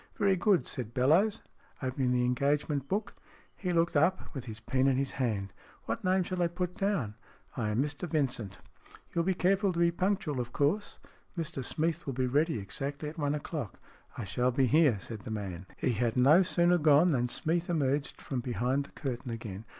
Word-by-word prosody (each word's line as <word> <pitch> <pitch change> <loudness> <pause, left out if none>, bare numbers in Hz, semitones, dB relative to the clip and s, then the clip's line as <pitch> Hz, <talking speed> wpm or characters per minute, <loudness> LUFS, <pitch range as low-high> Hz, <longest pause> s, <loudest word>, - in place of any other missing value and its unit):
" - - -34
Very 195 -1 +3
good," 190 0 +2
said 120 -4 -5
Bellowes, 170 - +3 0.4
opening 130 -1 -1
the 125 0 +2
engage 140 +4 +1
ment 140 -3 -2
book. 205 +6 -2 0.4
He 180 -3 -3
looked 170 -1 +2
up, 165 +6 +2
with 135 -4 -6
his 110 -2 -7
pen 130 +4 +1
in 135 -2 +3
his 135 0 -1
hand. 105 -7 -2 0.2
" - - -27
What - - -3
name 185 0 +3
shall 185 0 -3
I 175 - +4
put 180 +1 -3
down? 195 - 0
" - - -27
" - - -27
I 115 -5 -1
am 110 +5 +1
Mr 150 +4 -5
Vincent." 120 - -1 0.6
"You'll 170 - +1
be 190 +1 +1
careful 195 +2 +2
to 170 - -6
be 170 0 +4
punctual, 185 -5 -1
of 120 0 -4
course. 160 +9 0 0.4
Mr 155 -5 -3
Smeath 160 +4 -2
will 135 - -1
be 130 +1 0
ready 145 +3 +1
exactly 140 +9 -4
at 160 - -10
one 145 0 +1
o'clock." 150 - -5 0.2
" - - -24
I - - -3
shall 125 +6 0
be 130 +1 +2
here," 145 -3 +4
said 110 +4 -7
the 105 - -9
man. 95 -4 -5
He - - +1
had 115 +1 0
no 145 +8 +7
sooner 175 -1 +3
gone 155 +3 +5
than 125 -3 +1
Smeath 165 +6 -1
emerged 145 -3 0
from 130 - -3
behind 125 +3 -1
the - - -15
curtain 125 -2 -4
again. 110 -3 -6
140 Hz, 210 wpm, -30 LUFS, 125-170 Hz, 0.6 s, no